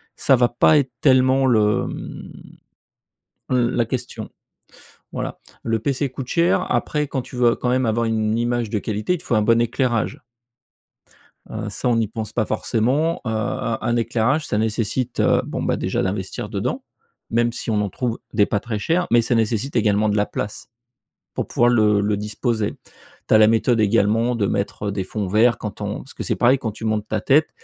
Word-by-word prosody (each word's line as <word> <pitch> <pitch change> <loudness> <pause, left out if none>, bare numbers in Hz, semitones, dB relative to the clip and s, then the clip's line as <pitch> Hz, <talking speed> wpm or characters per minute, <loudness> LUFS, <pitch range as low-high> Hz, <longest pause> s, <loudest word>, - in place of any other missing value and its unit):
ça 135 - +3
va 120 -1 +3
pas 150 +5 +4
être 135 -3 0
tellement 130 -1 +4
le 105 -4 +2
mmh, - - -8 1.2
heu 125 -2 +2
la 120 - +1
question. 125 +2 -5 0.8
Voilà, - - -4 0.3
le 115 -1 0
PC 140 +3 -1
coûte 130 -1 -7
cher, 170 +4 +2
après 150 -1 0
quand 135 -2 -2
tu 125 - -12
veux 120 -1 +4
quand 125 - -2
même 130 +1 +1
avoir 115 +1 +1
une 110 0 0
image 120 -1 -1
de 105 -1 -1
qualité, 105 - -2
il 180 - -2
te - - -14
faut 120 - 0
un 110 - +3
bon 115 +2 +3
éclairage. 120 -1 -1 1.3
Heu, - - -5
ça - - -3
on 115 - +2
y 110 - 0
pense 110 0 -6
pas 110 -3 0
forcément. 130 +9 0
Heu, 110 - -2
un 110 +1 -2
un 120 +1 0
éclairage 120 +6 +1
ça 105 - -1
nécessite, 115 +3 -1 0.2
bon, - - -4
bah - - 0
déjà - - -1
d'investir 95 0 -4
dedans - - -3 0.5
même 120 +1 +1
si - - -6
on 105 -2 +1
en 100 - -1
trouve 115 +4 -3
des 105 -1 +4
pas 100 - -1
très 110 -3 -4
cher 170 - +1
mais 120 0 +5
ça 120 - 0
nécessite 115 +4 0
également 105 -2 +2
de 105 - 0
la 105 - +2
place 105 0 -6 0.7
pour - - -2
pouvoir 120 0 +3
le 105 -4 +3
le 105 0 0
disposer. 105 +1 -2 0.5
Tu - - +2
as - - +8
la 110 - +6
méthode 115 +1 +2
également 110 +3 +2
de 105 -3 0
mettre 100 +1 -2
des 100 -1 -2
fonds 100 0 -4
verts 110 +5 +3
quand 105 0 -7
on 105 0 -3
parce 135 - -13
que - - -6
c'est - - -1
pareil 125 +3 +4
quand 110 -4 -3
tu 110 - -8
montres 110 -1 -1
ta 110 -1 -2
tête, 145 +6 +3
115 Hz, 200 wpm, -21 LUFS, 105-125 Hz, 1.3 s, as